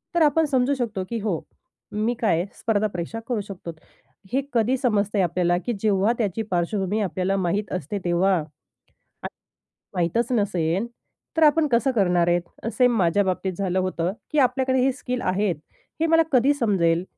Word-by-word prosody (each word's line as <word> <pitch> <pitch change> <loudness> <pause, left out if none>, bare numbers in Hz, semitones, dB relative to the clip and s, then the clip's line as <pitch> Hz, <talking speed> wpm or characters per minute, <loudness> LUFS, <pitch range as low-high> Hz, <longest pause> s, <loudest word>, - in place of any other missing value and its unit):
तर 340 - +3
आपण 310 +1 +4
समजू 270 -1 +1
शकतो, 225 -8 -2
की 235 - -2
"हो, 200 -6 -1 0.5
मी 215 +3 0
काय 220 - +2
आहे? - - -3
स्पर्धा 215 -1 +1
परीक्षा 180 +4 -5
करू 240 -4 -1
शकतो." 190 -4 -8 0.6
हे 270 - +2
कधी 240 +3 +2
समजते 210 -5 +1
आपल्याला 175 0 +1
की 240 - 0
जेव्हा 205 +1 +2
त्याची 215 -2 -1
पार्श्वभूमी 190 +4 0
आपल्याला 190 0 -1
माहीत 195 +3 -1
असते 185 +3 -3
तेव्हा. 180 +3 +3
आणि 155 -1 -5 1.6
माहीतच 235 +7 -1
नसेन 190 -4 0 0.5
तर 320 - +4
आपण 305 +1 +5
कसं 255 +1 +2
करणार 180 -7 +2
आहे? 175 +5 -1
सेम 250 -2 +3
माझ्या 185 +1 +3
बाबतीत 190 0 -1
झालं 190 -2 0
होतं 185 -2 -1 0.2
की 305 - +2
आपल्याकडे 260 0 +2
हे 265 - +3
स्किल 250 -1 -4
आहेत 185 -1 0 0.4
हे 325 - +2
मला 325 0 +5
कधी 265 +2 +4
समजेल? 185 -10 +1
205 Hz, 165 wpm, -24 LUFS, 180-250 Hz, 1.6 s, आपण